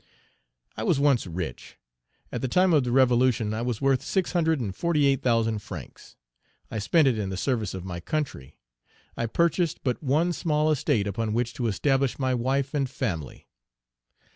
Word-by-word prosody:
I - - -5
was - - +2
once 140 -7 +2
rich. 85 -7 -6 0.5
At - - -4
the 130 - -1
time 180 +6 +3
of 145 -4 +4
the 125 - -2
revolution, 125 -4 +3
I 110 - -2
was 120 -1 -2
worth 135 -2 +2
six 190 -3 -1
hundred 160 -3 +1
and 100 -6 -4
forty 165 -4 +1
eight 135 -2 +2
thousand 115 -3 +1
francs. - - -10 0.6
I 110 - -3
spent 145 +9 +3
it 120 -5 +1
in 100 -2 -2
the 95 - -4
service 110 -5 -1
of 95 -1 -6
my 90 -2 -5
country. 110 - -4 0.6
I 115 - -2
purchased 170 +5 0
but 125 -3 -1
one 155 +5 +1
small 155 -2 +1
estate 135 -7 +1
upon 105 +2 -2
which 120 +1 -1
to 120 - -2
establish 135 +4 +1
my 130 -2 0
wife 135 +3 0
and 140 -3 0
family. 95 - -4
130 Hz, 180 wpm, -26 LUFS, 110-145 Hz, 0.6 s, of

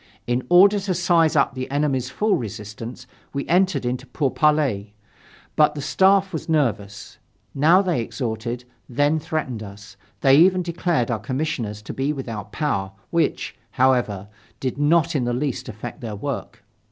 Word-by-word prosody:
In 125 +1 -1
order 200 +3 +6
to 195 -2 -2
size 170 -3 +3
up 140 - +3
the 130 -1 -5
enemy's 135 -3 0
full 210 +8 +1
resistance, 115 +2 -7 0.3
we 140 0 -3
entered 185 -4 +2
into 125 +2 -3
pourparlers. 140 -5 +1 0.7
But 150 -1 +4
the 145 - -4
Staff 195 +3 +3
was 160 - -5
nervous; 105 -9 -1 0.3
now 165 +7 +5
they 175 -10 0
exhorted, 115 0 -4 0.2
then 145 +5 +2
threatened 150 -7 -3
us, 100 0 -11 0.2
they 135 -1 +6
even 185 +3 +5
declared 170 -7 -1
our 115 - -1
commissioners 120 -4 -3
to - - -7
be 135 +3 -1
without 115 -7 -6
power, 100 -11 -2 0.2
which, 170 -1 0 0.2
however, 120 -7 +1 0.3
did 130 +1 -3
not 160 +2 +3
in 130 -4 +1
the 120 - 0
least 135 +1 -2
affect 120 +6 -8
their 110 -3 -5
work. 100 - -5
135 Hz, 155 wpm, -22 LUFS, 115-160 Hz, 0.7 s, order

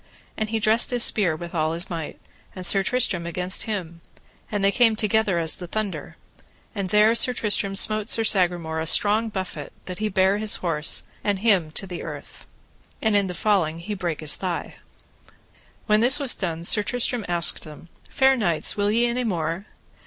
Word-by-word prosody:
And 215 -1 -3
he 225 - -1
dressed 220 +2 +3
his 245 -2 +2
spear 185 -7 +3
with 170 +2 -9
all 160 -1 -1
his 170 +3 -4
might, 165 -4 -7 0.4
and 185 -1 -6
Sir 195 +2 +3
Tristram 195 -6 0
against 180 +2 -1
him, 175 -7 -5 0.5
and 205 -2 -1
they 200 - +4
came 230 -1 +3
together 215 -3 0
as 165 -2 0
the 180 - -8
thunder, 215 +1 -5 0.6
and 200 -4 -4
there 210 +3 +4
Sir 250 +2 +4
Tristram 205 -3 0
smote 215 +2 +3
Sir 225 - +2
Sagramore 175 -6 +1
a 160 - -3
strong 215 +6 +3
buffet, 190 -3 -6
that 180 -1 -7
he 215 0 -1
bare 190 +1 +1
his 215 -1 +2
horse 165 -4 -1 0.2
and 205 -1 0
him 190 -6 +2
to 195 - -1
the 180 -2 -7
earth, - - -10 0.5
and 220 -2 0
in 200 -1 +2
the 180 - -6
falling 175 -6 0
he 195 +5 -6
brake 175 -6 -4
his 155 -2 +5
thigh. 180 -3 -5 1.1
When 210 -1 +3
this 250 +5 +5
was 280 -4 +2
done 170 -3 -5
Sir 210 +4 +2
Tristram 245 +1 -1
asked 170 -2 0
them: 155 +1 -13 0.2
Fair 265 -1 +3
knights, 175 -10 0
will 205 0 0
ye 230 +3 +2
any 240 +1 -1
more? 175 -2 -3
195 Hz, 190 wpm, -23 LUFS, 170-215 Hz, 1.1 s, his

